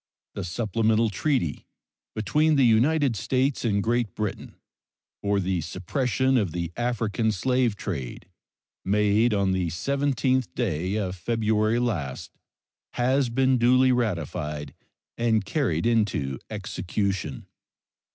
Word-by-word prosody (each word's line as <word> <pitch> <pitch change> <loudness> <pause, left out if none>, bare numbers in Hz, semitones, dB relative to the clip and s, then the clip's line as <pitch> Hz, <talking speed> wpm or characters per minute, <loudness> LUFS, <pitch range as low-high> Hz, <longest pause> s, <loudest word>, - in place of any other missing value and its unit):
The 100 - -4
supplemental 110 +3 +1
treaty 115 - -1 0.5
between 150 +8 +2
the 135 -3 +4
United 130 +3 +3
States 130 +6 0
and 100 -4 +1
Great 120 -3 0
Britain 105 -2 -4 0.7
for 100 0 +1
the 90 -2 -1
suppression 125 - 0
of 100 -9 0
the 85 -1 -3
African 115 -2 0
slave 125 +2 +1
trade, 85 - -5 0.6
made 105 +3 +3
on 100 -2 +1
the 95 -2 0
17th 130 - 0
day 95 -5 -1
of 95 -4 -2
February 110 +2 +1
last, 95 - -2 0.6
has 130 +1 +1
been 130 +1 +2
duly 130 +2 +5
ratified 85 - -2 0.5
and 110 -3 +2
carried 100 - 0
into 105 - 0
execution. 95 -5 -3
110 Hz, 110 wpm, -25 LUFS, 95-125 Hz, 0.7 s, duly